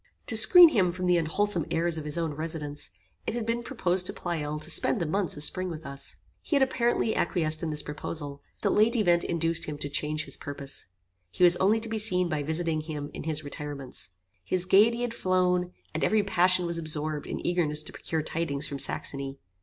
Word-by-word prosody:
To 225 - 0
screen 320 +11 +10
him 190 - +1
from 185 +1 -4
the 180 -1 +3
unwholesome 170 +2 +1
airs 165 -1 0
of 155 - -8
his 150 +2 -2
own 165 -3 -2
residence, 150 -1 -5 0.4
it - - -2
had 235 -2 -3
been 230 +1 -1
proposed 185 -8 +1
to - - -4
Pleyel 150 -4 -4
to - - -6
spend 230 - +2
the 170 - -1
months 180 0 -1
of 145 - +2
spring 185 +4 +1
with 160 -2 -8
us. 140 0 -4 0.3
He 310 - -2
had 275 - +4
apparently 240 -3 0
acquiesced 160 -3 +1
in 165 - -3
this 150 -1 0
proposal; 145 -1 -5 0.2
but - - +2
the - - 0
late 220 +3 +3
event 175 -6 +3
induced 165 0 -1
him 150 -1 -6
to 145 0 -4
change 150 +1 -1
his 140 - -5
purpose. 140 -1 -5 0.4
He 180 - -2
was 175 0 +9
only 205 +5 +2
to 230 - -7
be 220 0 -3
seen 180 -4 +3
by 155 -3 -2
visiting 160 +1 -2
him 150 -2 -7
in - - -8
his 155 -1 -2
retirements. 145 -4 -6 0.3
His 180 - 0
gaiety 215 +6 +4
had 245 -1 -2
flown, 180 -3 0 0.2
and - - -3
every 215 -1 +2
passion 185 -2 +3
was 170 0 -2
absorbed 155 -1 -4
in - - -6
eagerness 155 -4 +1
to - - -10
procure 160 -2 -4
tidings 150 -3 -2
from 140 -1 -5
Saxony. 135 0 -1
170 Hz, 215 wpm, -27 LUFS, 150-185 Hz, 0.4 s, screen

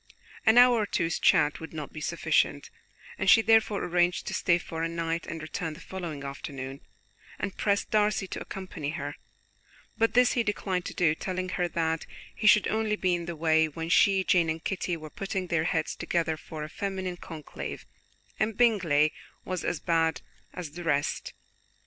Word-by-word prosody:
An 220 +2 +6
hour 245 -1 +7
or 215 - +1
two's 165 -4 -1
chat 150 - +4
would 160 - -9
not 155 -3 -6
be 155 - -7
sufficient, - - 0 0.5
and - - +2
she 225 - +7
therefore 220 -2 +3
arranged 175 0 +1
to - - -4
stay 180 -3 +3
for 165 -2 -6
a 165 - 0
night 165 0 -2
and 165 -2 -6
return 160 0 -4
the - - -12
following 170 -7 -6
afternoon, 140 -1 -6 0.6
and 195 - -4
pressed 200 -1 0
Darcy 210 -2 +2
to - - -5
accompany 185 -6 -6
her; 145 0 -5 0.8
but 225 +1 +2
this 250 0 +6
he 240 - +2
declined 195 -4 -2
to - - -6
do, 165 -4 +3
telling 185 +2 -3
her 180 -1 0
that 165 -1 -1 0.3
he 215 - -1
should 210 -1 +6
only 220 -1 0
be 185 -3 +1
in 170 -1 -2
the 170 - -4
way 160 0 +3
when 165 +2 -6
she, 195 +2 +4
Jane 175 -3 +3
and 160 +1 -3
Kitty 180 -2 -2
were 155 -1 -10
putting 195 -1 -3
their 170 -2 0
heads - - -1
together 165 -2 -1
for 155 0 -8
a - - -5
feminine 190 +1 -4
conclave, 155 -4 -7 0.5
and 215 0 0
Bingley 170 -11 +3 0.3
was 185 -1 -3
as 175 - -1
bad 165 -2 +1 0.3
as 170 -5 -7
the 175 +3 -8
rest. 145 -3 -1
175 Hz, 185 wpm, -28 LUFS, 160-195 Hz, 0.8 s, hour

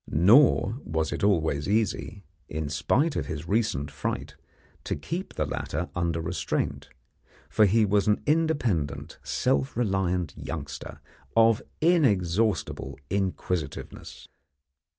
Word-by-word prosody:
Nor 115 - +4
was 80 0 -1
it - - -3
always 80 -6 +1
easy, 105 -1 -1 0.3
in 75 0 -3
spite 140 - +1
of - - -2
his 75 +1 -5
recent 100 -9 0
fright, 70 +1 -4 0.5
to - - -2
keep 170 - -5
the - - 0
latter - - -3
under 85 -1 0
restraint, 80 -2 -2 0.6
for 110 - +5
he 110 +2 +4
was 105 0 +2
an 105 - +3
independent, 145 - 0
self 130 -1 0
reliant 95 -7 0
youngster, 70 -3 -7 0.3
of 115 +1 +5 0.2
inexhaustible 110 - +1
inquisitiveness. 90 -5 -3
95 Hz, 110 wpm, -27 LUFS, 80-115 Hz, 0.6 s, for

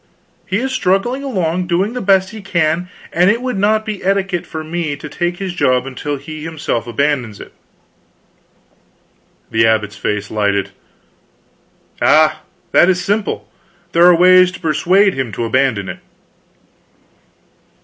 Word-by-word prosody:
He 190 - 0
is 260 +3 -2
struggling 240 +2 0
along, 180 -8 -1
doing 190 +6 0
the 250 - -4
best 190 -1 +2
he 220 -1 -9
can, 170 -2 0 0.2
and 180 +3 +4
it 220 +3 +2
would 255 -3 -3
not 215 +2 +2
be 215 -3 -5
etiquette 195 -2 -1
for 160 -1 -6
me 160 -2 -3
to 145 +2 -9
take 175 +4 -3
his 190 -2 -4
job 130 -6 +1
until 140 +2 -4
he 155 +3 -9
himself 150 -8 -3
abandons 125 -4 -1
it." - - -12 2.0
The 110 0 +3
abbot's 110 -2 0
face 105 -1 -3
lighted. 100 -2 0 1.3
"Ah, 155 0 +4 0.3
that 175 - +5
is 180 -1 0
simple. 205 0 -1 0.4
There 170 +1 +5
are 180 - +7
ways 185 +1 +6
to - - -9
persuade 180 +5 +2
him 130 -4 -3
to 115 - -2
abandon 115 -4 0
it." - - -7
175 Hz, 145 wpm, -17 LUFS, 135-195 Hz, 2.0 s, are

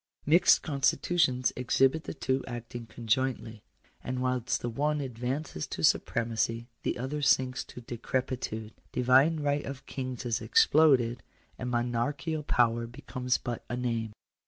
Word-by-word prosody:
Mixed 165 +5 +5
constitutions 140 -2 +1
exhibit 135 +5 +2
the - - -5
two 130 -2 -1
acting 120 -1 -7
conjointly. 115 0 -2 0.4
And 130 0 -3
whilst 125 -1 0
the - - -1
one 150 +5 0
advances 125 - -4
to - - -5
supremacy, 115 0 +1 0.2
the - - -2
other 135 +5 -3
sinks 130 -2 +2
into 125 - -10
decrepitude: 120 -2 -3 0.2
divine 135 +6 +4
right 145 0 0
of 135 0 -7
kings 130 -2 -5
is 115 -2 -1
exploded, 140 - +4 0.4
and 125 - -3
monarchical 125 +6 -1
power 120 -4 +1
becomes 125 0 -2
but 120 -2 -5
a 120 - -2
name. 115 -3 -2
125 Hz, 135 wpm, -29 LUFS, 120-140 Hz, 0.4 s, Mixed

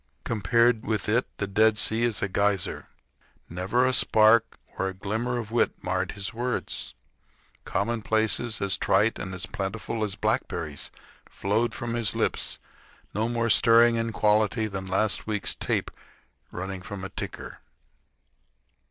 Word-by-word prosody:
Compared 115 +2 +2
with 110 -2 -1
it 115 +4 +2
the 100 - -1
Dead 110 +2 +3
Sea 110 +1 +1
is 120 -3 +1
a - - +2
geyser. 100 -1 0 0.6
Never 95 +9 0
a 130 - +2
sparkle 110 0 +4 0.2
or 95 - +1
a 95 - -5
glimmer 110 +6 -2
of 115 -2 -5
wit 120 - +2
marred - - -1
his 100 +2 -5
words. 120 +2 -3 0.7
Commonplaces 110 +2 0
as 100 -1 +1
trite 105 +4 +2
and 95 - -5
as 90 0 -5
plentiful 105 +4 -4
as 100 -2 -2
blackberries - - -2 0.4
flowed 110 +5 -1
from 120 -1 -4
his 115 -3 0
lips - - 0 0.6
no 110 +3 0
more 115 -1 +1
stirring 115 0 +6
in 115 0 -1
quality 110 +1 +2
than 95 -2 -5
a - - -8
last 105 +3 +1
week's 105 -2 0
tape - - -1 0.6
running 95 +1 -5
from 95 0 -7
a 95 - -4
ticker. - - -7
110 Hz, 145 wpm, -26 LUFS, 100-115 Hz, 0.7 s, stirring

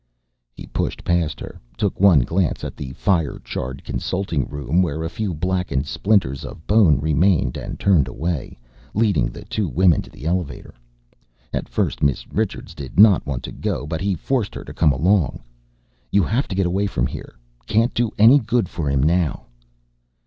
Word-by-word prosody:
He - - -9
pushed - - -3
past 85 -3 0
her, - - -9 0.2
took 100 - -1
one 95 -8 +7
glance 85 +6 -1
at - - -5
the 65 -2 -6
fire 85 -4 0
charred 65 +2 -5
consulting 90 -8 -2
room 75 +4 0
where 80 -3 -1
a 80 - -4
few 105 0 -2
blackened 90 -4 -1
splinters 75 -5 +1
of 80 - -9
bone 100 - +5
remained 75 -2 +2
and - - -6
turned 85 -9 +3
away, 80 +2 -4 0.4
leading 105 - +2
the - - -10
two 105 -3 -2
women 85 +2 +3
to - - -12
the 70 - -12
elevator. 85 -6 -3 0.8
At - - -3
first - - -1
Miss 70 -3 +1
Richards 110 -1 -2
did 70 +4 -6
not 105 -7 +6
want 65 -3 -3
to - - -6
go - - -3
but 80 +1 -4
he 100 -1 0
forced 115 - -2
her - - -6
to - - -10
come 75 - +3
along. 80 -2 +1 0.7
"You 100 -1 +4
have 125 +6 0
to 95 - -4
get 95 -1 +1
away 95 +3 0
from - - -1
here 65 - -7 0.3
can't 115 +3 +2
do 120 -1 +1
any 115 +7 +7
good 115 -3 0
for 80 -4 -3
him 70 -1 +1
now." 85 0 +1
85 Hz, 180 wpm, -21 LUFS, 70-100 Hz, 0.8 s, one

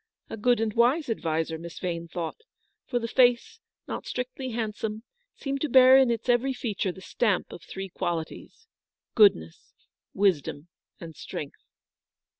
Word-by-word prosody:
A - - -3
good 240 +2 +2
and 220 -1 -1
wise 250 +6 +2
adviser, 160 -4 -2
Miss 170 0 -9
Vane 170 -2 -4
thought: 170 - -5 0.5
for 245 - -1
the 230 -1 -2
face, 245 - +2 0.3
not - - -5
strictly 255 +1 -4
hand 225 -2 -3
some, 215 +1 -5 0.3
seemed 275 -1 -4
to 305 - -1
bear 260 +1 +8
in 265 -2 +6
its 230 +1 -2
every 245 +2 +2
feature 205 -6 -2
the 190 - -13
stamp 195 +2 -1
of - - -9
three 195 0 -7
qualities 170 - -5 0.3
— - - -66
goodness, 85 - +3 0.4
wisdom, 175 -5 0 0.3
and 165 -2 -9
strength. 145 - -7
220 Hz, 155 wpm, -27 LUFS, 170-250 Hz, 0.5 s, bear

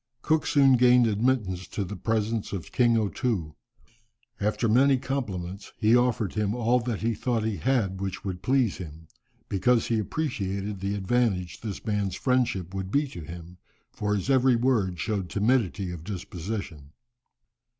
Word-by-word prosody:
Cook 155 -1 +1
soon 135 -3 +5
gained 125 0 +6
admittance 105 -4 0
to 100 - -3
the 100 +2 -6
presence 110 +2 -1
of 95 -4 -5
King 120 -2 +3
O 110 -2 +1
Too. 95 -9 -2 0.9
After 105 +3 0
many 130 +5 +4
compliments 100 -9 -4
he 110 +2 +4
offered 120 -4 +1
him 105 0 0
all 120 +1 +2
that 115 -3 -3
he 115 +1 +1
thought 115 -1 -1
he 110 -2 -1
had 95 - 0
which 95 0 -4
would 90 -2 -4
please 130 -5 +1
him, 80 -2 -9 0.4
because 115 +4 +2
he 115 -2 +2
appreciated 105 - -3
the 100 +1 -2
advantage 100 -3 0
this 105 -2 -6
man's 105 -4 -1
friendship 120 -9 0
would 95 -1 -4
be 145 +7 +2
to 85 - -8
him, 85 +2 -10 0.3
for 105 0 -1
his 100 - -3
every 130 -2 +4
word 115 -8 +1
showed 95 +2 -2
timidity 100 -4 +1
of 85 -3 -7
disposition. 90 -5 -6
105 Hz, 160 wpm, -27 LUFS, 95-125 Hz, 0.9 s, gained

